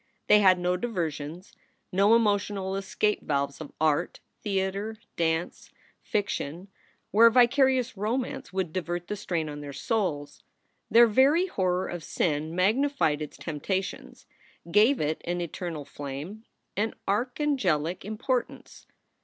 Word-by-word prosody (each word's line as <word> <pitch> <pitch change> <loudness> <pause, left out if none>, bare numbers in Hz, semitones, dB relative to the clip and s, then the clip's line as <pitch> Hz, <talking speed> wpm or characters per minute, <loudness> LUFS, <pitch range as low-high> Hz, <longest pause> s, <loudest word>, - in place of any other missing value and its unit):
They 210 - +6
had 185 -2 +6
no 180 0 0
diversions, 170 -5 -4 0.4
no 200 +4 +5
emotional 205 -3 +1
escape 195 +2 0
valves 140 0 -2
of 150 - -8
art, 155 -2 +1 0.2
theater, 200 +2 -2 0.2
dance, 165 +1 -1 0.3
fiction, 190 -3 -3 0.4
where 230 +3 +7
vicarious 255 +1 +3
romance 230 +6 -3
would 185 -4 -2
divert 175 -1 -3
the 210 - -1
strain 175 -6 -2
on 145 0 -6
their 145 -1 -7
souls. 170 - -2 0.5
Their 235 +1 +8
very 270 - +4
horror 185 - 0
of 175 -2 -6
sin 155 0 -1
magnified 210 - +2
its 150 - -6
temptations, 185 +5 -4 0.5
gave 220 +8 +5
it 155 +1 -1
an 175 +1 -2
eternal 170 -3 -5
flame, 145 +10 -7 0.3
an 215 +3 -1
archangelic 205 - 0
importance. 235 +4 -3
190 Hz, 120 wpm, -27 LUFS, 160-220 Hz, 0.5 s, Their